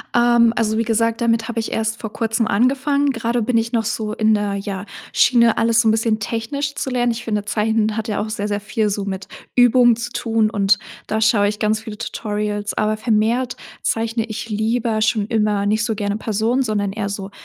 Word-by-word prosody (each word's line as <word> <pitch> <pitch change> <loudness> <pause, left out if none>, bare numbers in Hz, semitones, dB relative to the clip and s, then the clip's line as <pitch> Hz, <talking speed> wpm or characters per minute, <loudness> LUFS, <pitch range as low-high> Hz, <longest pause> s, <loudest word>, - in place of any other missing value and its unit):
Ähm, 235 -1 +4
also, 220 -1 0
wie 230 - +2
gesagt, 230 0 0
damit 230 -1 +1
habe 230 -1 -2
ich 225 - -3
erst 220 0 -1
vor 220 -2 -6
Kurzem 225 -1 0
angefangen. 275 +6 +2
Grade 235 0 -1
bin 230 +2 +1
ich 230 +1 -1
noch 225 -1 +2
so 215 0 -2
in 220 0 +2
der, 205 -1 0
ja, 195 -1 -5 0.3
Schiene 235 -2 +4
alles 230 0 +3
so 225 - +3
'n - - +5
bisschen 225 0 +1
technisch 230 +7 -3
zu 265 - -3
lernen. 245 -1 +1
Ich 235 +1 -5
finde, 210 -2 -1
Zeichnen 215 +1 0
hat 220 +1 -3
ja 210 -2 -1
auch 215 - -4
sehr 210 -1 -3
sehr 205 -1 -2
viel 210 +1 -1
so 200 0 -2
mit 190 -1 -5 0.3
Übung 245 -1 +5
zu 235 +1 -5
tun 225 -2 +1
und 200 -1 +2 0.3
da 220 - -1
schaue 220 -2 +3
ich 210 - -5
ganz 215 0 +1
viele 220 -2 -8
Tutorials, 210 -2 -3
aber 215 0 +1
vermehrt 230 +3 0 0.3
zeichne 225 0 -1
ich 230 0 -6
lieber 220 +1 0
schon 215 -1 +1
immer 210 -3 +1
nicht 215 +2 +1
so 220 -2 -1
gerne 205 -1 -2
Personen, 225 +4 0
sondern 205 -4 -1
eher 205 -2 -3
so 195 -1 -5
220 Hz, 215 wpm, -20 LUFS, 210-230 Hz, 0.3 s, n